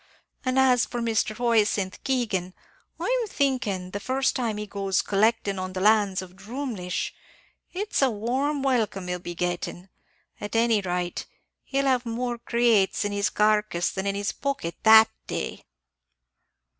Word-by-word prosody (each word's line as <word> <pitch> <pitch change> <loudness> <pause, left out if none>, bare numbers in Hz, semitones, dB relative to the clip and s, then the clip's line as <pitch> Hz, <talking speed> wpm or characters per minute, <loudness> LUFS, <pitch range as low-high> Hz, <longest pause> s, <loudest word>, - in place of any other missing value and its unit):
An' 255 -1 0
as 255 -2 +4
for 240 - -4
Mr. 220 -2 0
Hyacinth 215 -5 +1
Keegan, 210 -9 -1 0.4
I'm - - 0
thinking, 230 - -1
the 205 - -4
first 260 +5 0
time 230 -5 -1
he 210 - -4
goes 195 -2 -1
collectin' 205 -1 +1
on 185 0 -4
the 185 - -3
lands 205 -2 +3
of 185 0 -13
Drumleesh, 210 -3 -4 0.6
it's 410 -1 -1
a 270 - +5
warm 260 +6 -1
welcome 220 -8 0
he'll 180 0 -2
be 175 0 -7
gettin'; 175 +1 -3 0.5
at 205 +2 -6
any 225 -2 +3
rate, 180 -1 -3 0.4
he'd 275 0 0
have 255 -2 +2
more 240 +1 -2
recates 230 -5 +3
in 205 - -1
his 205 0 0
carcass 210 -4 +1
than 190 +1 -3
in 200 - 0
his 200 0 -1
pocket, 275 -12 -3
that 220 0 +8 0.2
day." - - -4
215 Hz, 150 wpm, -26 LUFS, 190-250 Hz, 0.6 s, that